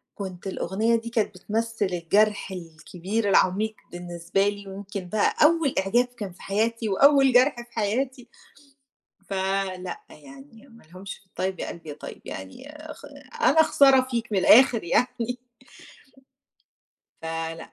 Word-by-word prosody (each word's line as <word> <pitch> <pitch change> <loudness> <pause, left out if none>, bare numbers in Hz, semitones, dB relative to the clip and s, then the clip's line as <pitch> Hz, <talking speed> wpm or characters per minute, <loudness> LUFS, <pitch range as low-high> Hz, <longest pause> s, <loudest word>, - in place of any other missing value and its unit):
كنت 190 -2 -7
الأغنية 205 +5 0
دي 230 0 -3
كانت 225 -4 -1
بتمثل 225 +2 -2
الجرح 195 +3 +1
الكبير 180 +5 -4
العميق 205 +4 +2 0.2
بالنسبة 175 +2 -2
لي، 205 -1 -8
ويمكن 195 -1 -7
بقى 215 -1 +1
أول 320 -3 +3
إعجاب 235 +6 +2
كان 230 -6 -8
في - - -19
حياتي، 220 +2 -1
وأول 275 +4 +5
جرح 255 +2 +5
في 240 0 -11
حياتي. 240 +4 -2 1.0
فلأ 190 -1 -2
يعني 145 - -15
ما 230 - -18
لهمش 185 +4 -9
في 195 - -29
الطيّب 190 0 -4
يا - - -4
قلبي 165 -2 -9
يا - - -6
طيّب، 150 - -10
يعني 260 - -9 0.2
خ - - -16 0.4
أنا 320 - +5
خسارة 275 -4 +5
فيك 235 -2 -3
من 195 - +2
الآخر 230 +2 +6
يعني. 245 +5 0 1.8
فلأ. 165 0 -5
205 Hz, 135 wpm, -25 LUFS, 185-235 Hz, 1.8 s, الآخر